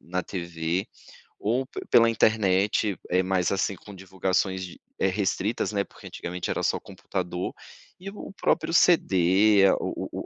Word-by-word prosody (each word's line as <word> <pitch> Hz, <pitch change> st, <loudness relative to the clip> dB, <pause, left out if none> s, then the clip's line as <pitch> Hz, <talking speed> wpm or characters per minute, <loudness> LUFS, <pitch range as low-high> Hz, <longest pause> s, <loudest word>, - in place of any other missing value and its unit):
na 90 Hz, +2 st, -3 dB
TV, 85 Hz, 0 st, -3 dB, 0.5 s
ou 120 Hz, +5 st, 0 dB
p 130 Hz, -, -8 dB
pela 115 Hz, 0 st, +6 dB
internet, 105 Hz, -2 st, +2 dB
eh, 90 Hz, +1 st, +2 dB
mais 95 Hz, -1 st, 0 dB
assim, 100 Hz, 0 st, 0 dB
com 100 Hz, +3 st, -12 dB
divulgações 95 Hz, 0 st, -1 dB
de 90 Hz, -, -12 dB, 0.2 s
eh, -, -, +2 dB
restritas, 100 Hz, +3 st, -1 dB
né, 100 Hz, -1 st, -1 dB
porque -, -, -14 dB
antigamente 90 Hz, 0 st, -5 dB
era -, -, -2 dB
só -, -, +1 dB
computador, 90 Hz, -2 st, -5 dB, 0.4 s
e 190 Hz, +2 st, -8 dB
o 205 Hz, -, -9 dB
o -, -, -11 dB
próprio 165 Hz, -, 0 dB
CD, 100 Hz, -, +4 dB
a 95 Hz, -, +5 dB
o -, -, -4 dB
o -, -, -5 dB
95 Hz, 165 wpm, -26 LUFS, 90-105 Hz, 0.5 s, pela